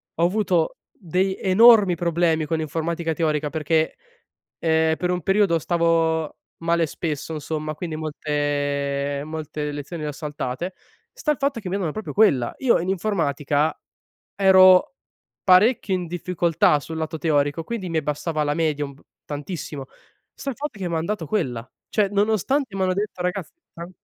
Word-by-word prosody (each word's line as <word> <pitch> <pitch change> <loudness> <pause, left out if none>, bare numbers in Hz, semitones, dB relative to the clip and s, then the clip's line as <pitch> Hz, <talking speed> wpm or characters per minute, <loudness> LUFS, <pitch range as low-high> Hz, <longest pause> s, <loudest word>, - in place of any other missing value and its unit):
ho 165 - 0
avuto 180 -3 +1
dei 190 +2 -1
enormi 205 -1 +6
problemi 170 -1 +1
con 160 +2 -1
l'informatica 165 +1 -2
teorica 150 -2 0
perché, 160 +1 0 0.6
ehm, 160 -1 +2
per 180 0 -1
un 180 -1 -1
periodo, 195 -3 +3
stavo 165 -2 +1 0.3
male 170 0 +2
spesso, 155 0 -4
insomma, 155 0 -4
quindi 160 0 -5
molte 145 -2 -2
molte 155 -1 -4
lezioni 145 +3 -6
le 150 - -2
ho - - -3
saltate. 150 +2 -4 0.4
Sta - - -1
il 300 - -1
fatto 275 -3 -1
che 185 - -5
mi 190 - -1
hanno 195 -3 -1
da 155 - -1
proprio 215 - -5
quella. 140 - +3
Io, 260 -3 +3
in 175 +3 -3
informatica, 155 -6 0 0.6
ero 190 - +6 0.5
parecchio 200 +3 +4
in 180 -1 -3
difficoltà 170 -3 +1
sul 160 +2 -7
lato 160 0 -3
teorico, 145 0 +1
quindi 220 -1 -4
mi 165 - -4
abbassava 155 +1 -1
la 145 0 0
media 155 -3 0
un 140 - -9
p - - -21 0.3
tantissimo. 145 -1 -6 0.5
Sta 275 - -6
il 245 - -10
fatto 295 -7 -5
che 180 -2 -3
mi 170 - -2
han 160 +1 -1
dato 205 -5 -3
quella. 130 - -2 0.2
Cioè, 205 -2 +1
nonostante 220 +5 0
m'hanno 185 -1 +1
detto: 200 -1 -3
"Ragazz 180 0 -2 0.2
tran" 170 +1 -8
165 Hz, 160 wpm, -23 LUFS, 150-190 Hz, 0.6 s, enormi